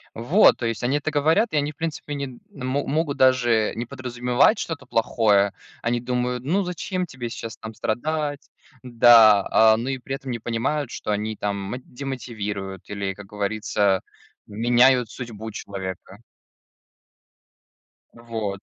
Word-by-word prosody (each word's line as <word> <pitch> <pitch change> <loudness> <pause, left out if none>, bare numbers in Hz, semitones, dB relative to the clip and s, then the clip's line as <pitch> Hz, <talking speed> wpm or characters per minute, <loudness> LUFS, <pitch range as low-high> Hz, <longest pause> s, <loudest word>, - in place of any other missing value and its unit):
Вот. 145 - +4
То 120 - -2
есть 115 -1 -3
они 130 +4 +1
это 150 +2 -3
говорят, 160 +10 +2
и - - 0
они, 145 0 0
в - - -33
принципе, 160 -2 -4
не 140 -4 -5
мо 135 +1 -3
могут 150 0 -1
даже 120 -4 +3
не 120 +2 -3
подразумевать 125 - +1
что-то 160 -3 -4
плохое. 105 -3 +2 0.3
Они 120 +1 0
думают: 125 0 -2
ну 180 +8 +1
зачем 180 +1 -3
тебе 125 -6 -6
сейчас 115 -1 -7
там 110 - -8
страдать, 145 +6 -2 0.3
да, 115 -4 +6
а, 110 0 +6
ну 120 +3 -3
и 135 -1 -2
при 130 +2 -5
этом 135 -1 -8
не 120 - -2
понимают, 120 +5 -2
что 105 - -4
они 105 +1 -2
там 100 -1 -2
мо 100 +5 -5
демотивируют 110 -8 -6
или, 100 -1 -3
как 105 +1 -11
говорится, 105 -1 0 0.4
меняют 120 +3 +3
судьбу 110 -3 -7
человека. 95 -2 -7 1.9
Вот. 110 -4 -5
120 Hz, 145 wpm, -23 LUFS, 110-135 Hz, 1.9 s, да